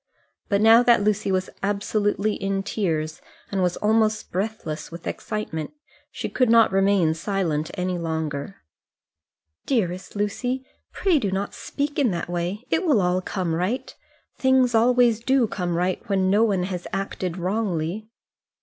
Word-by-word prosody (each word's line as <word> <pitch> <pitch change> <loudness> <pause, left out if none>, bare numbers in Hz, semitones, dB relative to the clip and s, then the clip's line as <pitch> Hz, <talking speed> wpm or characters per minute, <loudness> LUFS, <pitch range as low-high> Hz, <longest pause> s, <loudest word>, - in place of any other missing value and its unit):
But 200 -1 +2
now 225 +2 +7
that 240 -3 +4
Lucy 210 -1 +1
was 185 0 -1
absolutely 205 +1 0
in 195 -1 -2
tears, 160 -7 -2 0.3
and 195 -1 0
was 180 -1 +1
almost 215 0 +1
breathless 185 -6 -4
with 170 0 -9
excitement, 160 -8 -4 0.4
she - - -5
could 255 -3 +1
not 230 -2 +6
remain 195 -4 +3
silent 165 -3 -1
any 180 -1 -2
longer. 160 - -4 1.0
"Dearest 185 -8 -1
Lucy, 245 +6 -2 0.3
pray 360 -6 +2
do 205 - -1
not 195 +1 -2
speak 290 +1 -3
in 270 -5 +3
that 175 -2 -3
way; 175 +6 -3
it - - +2
will 300 - +3
all 180 0 +1
come 180 -3 -2
right. 185 +10 -2 0.4
Things 260 -2 +3
always 235 0 +4
do 260 +1 +2
come 180 -5 -2
right 180 +1 0
when 190 -1 +2
no 210 +3 +4
one 195 -5 +1
has 180 -1 -4
acted 190 -2 -3
wrongly." 190 +1 -2
195 Hz, 150 wpm, -24 LUFS, 180-225 Hz, 1.0 s, now